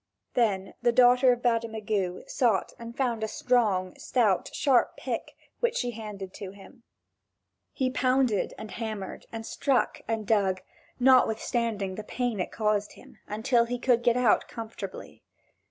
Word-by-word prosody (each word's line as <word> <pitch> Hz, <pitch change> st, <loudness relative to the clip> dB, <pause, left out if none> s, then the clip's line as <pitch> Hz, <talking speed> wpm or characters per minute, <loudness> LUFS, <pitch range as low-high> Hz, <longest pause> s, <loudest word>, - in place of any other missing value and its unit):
Then 200 Hz, -6 st, +1 dB
the 240 Hz, 0 st, +3 dB
daughter 250 Hz, +1 st, +6 dB
of 245 Hz, 0 st, -2 dB
Bademagu 220 Hz, -5 st, -1 dB
sought 225 Hz, -7 st, +1 dB
and 235 Hz, 0 st, -9 dB
found 240 Hz, -5 st, 0 dB
a -, -, 0 dB
strong, 210 Hz, -7 st, +1 dB
stout, 215 Hz, -7 st, +1 dB
sharp 265 Hz, -5 st, +2 dB
pick, -, -, -4 dB, 0.2 s
which 475 Hz, 0 st, +1 dB
she 245 Hz, -1 st, -1 dB
handed 210 Hz, -4 st, -7 dB
to 195 Hz, -, -7 dB
him. 200 Hz, +4 st, -15 dB, 0.9 s
He 255 Hz, -1 st, -1 dB
pounded, 255 Hz, -5 st, +1 dB
and 215 Hz, -, -8 dB
hammered 215 Hz, -4 st, -6 dB
and 225 Hz, -1 st, -6 dB
struck 270 Hz, +2 st, 0 dB
and 225 Hz, -1 st, -2 dB
dug, 195 Hz, -3 st, +2 dB, 0.4 s
notwithstanding 230 Hz, -5 st, +2 dB
the 215 Hz, -, -6 dB
pain 245 Hz, -1 st, -2 dB
it 180 Hz, -, -2 dB
caused 210 Hz, -2 st, 0 dB
him, -, -, -17 dB
until 235 Hz, +3 st, +2 dB
he 245 Hz, +1 st, -3 dB
could 245 Hz, -1 st, +2 dB
get 240 Hz, 0 st, +3 dB
out 245 Hz, -4 st, +3 dB
comfortably. 225 Hz, -1 st, -8 dB
230 Hz, 145 wpm, -28 LUFS, 210-245 Hz, 0.9 s, daughter